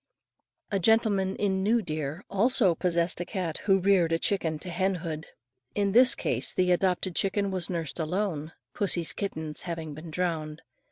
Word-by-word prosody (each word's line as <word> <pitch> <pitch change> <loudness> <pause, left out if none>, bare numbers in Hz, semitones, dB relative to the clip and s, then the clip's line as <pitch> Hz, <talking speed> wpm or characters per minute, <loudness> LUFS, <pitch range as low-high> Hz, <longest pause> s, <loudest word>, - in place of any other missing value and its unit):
A 200 - +1
gentleman 200 -2 +2
in 190 -2 0
New 220 +3 +2
Deer, 155 +2 -4
also 205 -2 +3
possessed 170 0 -1
a - - 0
cat 180 -6 -4
who 195 -2 +4
reared 185 -3 +3
a 165 - +3
chicken 165 -4 0
to 175 +4 -7
hen 190 +2 0
hood. 160 -2 -5 0.5
In 200 -1 +1
this 250 +4 +7
case - - +1
the 180 -1 +2
adopted 180 0 0
chicken 200 0 0
was 185 -3 -3
nursed 170 -3 -4
alone, 165 -2 -2 0.2
pussy's 175 -5 0
kittens 160 -6 -4
having 165 -3 -5
been 155 +3 -9
drowned. 160 -2 -3
180 Hz, 165 wpm, -27 LUFS, 165-195 Hz, 0.5 s, this